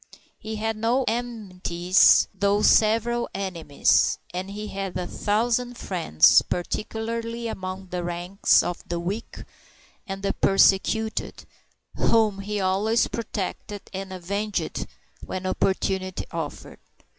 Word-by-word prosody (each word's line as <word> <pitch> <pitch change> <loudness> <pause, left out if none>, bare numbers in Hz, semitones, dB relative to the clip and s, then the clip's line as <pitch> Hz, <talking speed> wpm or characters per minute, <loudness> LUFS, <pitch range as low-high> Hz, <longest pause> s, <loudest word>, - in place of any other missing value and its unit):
He 220 0 -6
had 220 0 -2
no 240 +4 +1
enmities 195 -6 +3
though 200 +2 +1
several 230 +2 +3
enemies 170 -7 +1 0.2
and 185 +2 -4
he 210 +1 -6
had 195 -2 -4
a 180 - -3
thousand 240 +5 0
friends, 165 - +4
particularly 230 +5 -3
among 190 -2 -6
the 180 -1 -3
ranks 175 +3 +2
of 175 - -4
the 170 0 -2
weak 195 +7 -5 0.6
and 195 0 -6
the 200 - 0
persecuted, 200 +3 +2 0.5
whom 215 -3 +2
he 205 +1 -3
always 200 +4 +2
protected 205 -2 -5
and 190 0 -5
avenged 200 +3 -3 0.4
when 185 0 -5
opportunity 190 0 -1
offered. 165 -4 -6
200 Hz, 110 wpm, -25 LUFS, 185-220 Hz, 0.6 s, friends